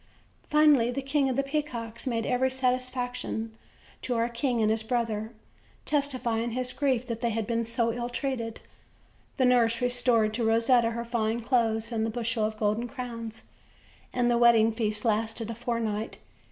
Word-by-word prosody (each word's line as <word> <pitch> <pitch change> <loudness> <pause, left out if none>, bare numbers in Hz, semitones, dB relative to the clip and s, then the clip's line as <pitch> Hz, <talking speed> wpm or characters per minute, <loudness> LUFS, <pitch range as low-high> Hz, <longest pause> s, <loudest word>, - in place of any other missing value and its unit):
Finally, 300 -6 +5
the 245 +2 -2
King 275 0 +1
of 255 - -1
the 275 - +1
Peacocks 270 -5 -3
made 230 -3 -1
every 260 +1 +2
satisfac 255 -1 -1
tion 225 -2 -4 0.5
to 250 - -2
o"ur 230 +1 +1
king 240 0 -1
and 215 -1 +3
his 220 0 +1
brother, 220 -2 -2 0.5
testifying 245 -6 -1
his 255 +1 -2
grief 260 -4 0
that 230 -2 -5
they 235 - +1
had 225 -1 -1
been 230 0 -1
so 230 0 +1
long 230 - -2
ill 240 0 -3
treated. 245 -3 -3 0.8
The 260 - +3
nurse 235 -2 +3
restored 245 -3 +2
to 235 +1 -1
Rosetta 230 +1 +3
her 235 +1 -4
fine 230 -1 -1
clothes, 230 -2 +1
and 225 -1 0
the 225 - 0
bushel 230 -1 -1
of 215 0 -3
golden 215 +3 0
crowns, 230 -3 -7 0.7
and 245 -1 +1
the 235 - +2
wedding 230 -2 +6
feast 215 -1 -2
lasted 225 +1 0
a - - -3
fortnight. 230 -2 -3
235 Hz, 175 wpm, -28 LUFS, 225-250 Hz, 0.8 s, wedding